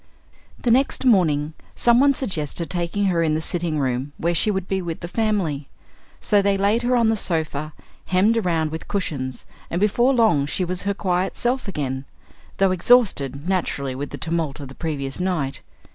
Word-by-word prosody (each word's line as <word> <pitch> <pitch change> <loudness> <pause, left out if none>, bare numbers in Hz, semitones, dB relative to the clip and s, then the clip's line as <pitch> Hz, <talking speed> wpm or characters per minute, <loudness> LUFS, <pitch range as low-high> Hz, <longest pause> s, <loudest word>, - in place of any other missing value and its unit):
The 240 - +1
next 265 +2 +2
morning 160 - +3 0.2
some 240 0 +4
one 280 0 +4
suggested 165 - -3
taking 175 +3 -1
her 175 -3 +2
in 155 -2 +1
the - - 0
sitting 165 -1 -1
room 130 0 -1
where 170 +1 0
she 175 - +2
would 190 -3 -1
be 190 -1 -1
with 170 -2 -5
the 170 - -5
family. 180 -9 -1 0.5
So 205 -1 +3
they 200 0 +2
laid 205 +4 +2
her 245 +1 +1
on 230 -2 +3
the 225 - +2
sofa, 155 -5 -1 0.3
hemmed 195 +5 +3
around 165 -7 0
with 160 +1 -6
cushions, 140 -10 -3 0.2
and 170 - -1
before 235 +6 +3
long 220 - +3
she 180 +5 -1
was 180 +1 -4
her 200 - 0
quiet 185 -1 -1
self 250 0 0
again, 135 -7 -3 0.5
though 195 -1 +3
exhausted, 175 - +2
naturally, 150 -8 -1
with 140 +2 -5
the - - -7
tumult 160 -4 -2
of 140 -2 -8
the - - -10
previous 140 -3 -4
night. 175 -7 -1
175 Hz, 185 wpm, -22 LUFS, 150-205 Hz, 0.5 s, some